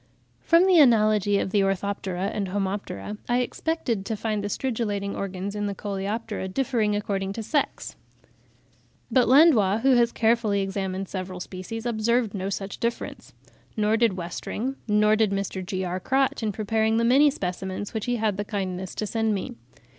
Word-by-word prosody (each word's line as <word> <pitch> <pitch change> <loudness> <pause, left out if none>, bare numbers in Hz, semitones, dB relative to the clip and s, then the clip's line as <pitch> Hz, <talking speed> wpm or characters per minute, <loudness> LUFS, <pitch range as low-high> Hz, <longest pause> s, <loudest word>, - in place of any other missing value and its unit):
From 335 +2 +4
the 370 -3 +6
analogy 215 -6 +4
of 190 - -1
the 205 - +3
Orthoptera 195 0 -1
and 200 -2 -2
Homoptera, 200 +2 -3
I 245 +1 +3
expected 245 -5 -2
to 220 - -1
find 215 -1 -2
the - - -1
stridulating 205 -4 -2
organs 195 +1 -4
in 205 0 -1
the 200 - -3
Coleoptera 205 +1 -3
differing 220 -1 0
according 195 -2 -2
to 225 - -5
sex; 290 +6 -2 1.2
but 255 -2 +4
Landois, 235 - +5
who 270 +2 +4
has 235 0 +3
carefully 225 -3 +2
examined 195 0 -3
several 185 -1 -5
species, 190 +6 -7
observed 235 -1 +1
no 195 -1 -3
such 195 0 -5
difference; 235 0 -4 0.4
nor 215 +1 +2
did 230 -2 +3
Westring; 190 +8 -4
nor 210 0 +4
did 215 -1 +2
Mr. 195 -1 -3
G.R. 185 -1 -3
Crotch 265 +7 +1
in 220 -2 0
preparing 220 +2 0
the 230 - +2
many 275 +5 +6
specimens 190 -3 -4
which 220 -2 -3
he 245 - +1
had 215 -4 0
the 205 - -1
kindness 190 -3 -4
to 215 - -2
send 220 0 0
me. 245 +6 -4
210 Hz, 165 wpm, -25 LUFS, 195-230 Hz, 1.2 s, the